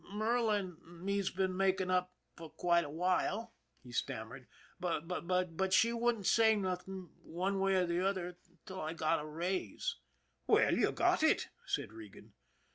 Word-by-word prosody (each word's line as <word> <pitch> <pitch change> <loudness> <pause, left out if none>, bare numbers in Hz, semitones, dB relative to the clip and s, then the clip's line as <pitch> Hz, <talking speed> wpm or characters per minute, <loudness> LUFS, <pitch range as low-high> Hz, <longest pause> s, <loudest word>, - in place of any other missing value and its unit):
" - - -16
Merla 220 +1 +2
an' 185 -5 -6 0.3
me's 200 -1 +1
been 190 0 -1
making 190 -1 +1
up 180 0 +1 0.2
for 165 -1 -9
quite 170 +2 +2
a 145 - -6
while," 185 +7 0 0.3
he 125 - -12
stammered: 120 +2 -4 0.2
" - - -28
but 180 +1 -1
she 230 +4 +5
wouldn't 235 -3 0
say 220 +1 +5
nothing 185 -2 -4
one 190 +4 -2
way 195 0 +2
or 185 -1 +3
the 170 +1 0
other 180 -2 -2 0.3
till 190 -1 -6
I 155 +1 -3
got 160 -1 +1
a - - -7
raise." 170 - -2 0.3
" - - -44
Well, - - +5
you - - +2
got - - +2
it," - - +3 0.2
said 110 - -2
Regan. 110 -3 -12
185 Hz, 170 wpm, -34 LUFS, 170-195 Hz, 0.3 s, she